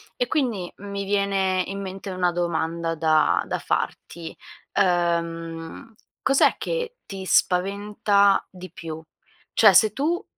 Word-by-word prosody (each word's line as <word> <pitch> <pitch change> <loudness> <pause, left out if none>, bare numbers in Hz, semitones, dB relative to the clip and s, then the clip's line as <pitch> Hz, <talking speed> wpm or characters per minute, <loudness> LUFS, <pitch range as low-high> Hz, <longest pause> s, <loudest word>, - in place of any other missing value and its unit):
E 245 - -1
quindi 235 - -1
mi 200 0 -5
viene 195 -2 +1
in 195 0 -5
mente 195 +1 -6
una 180 -1 +1
domanda 170 -1 -1
da 155 - +3
da - - -1
farti: 165 -1 -4 0.4
ehm, 170 +1 -1 0.3
cos'è 270 +1 +4
che - - -3
ti 195 -1 -7
spaventa 200 +2 +2
di 185 -2 -11
più? 160 -2 -8 0.5
Cioè 210 -4 +7
se 215 +3 +6
tu 335 - -1
190 Hz, 120 wpm, -24 LUFS, 170-205 Hz, 0.5 s, Cioè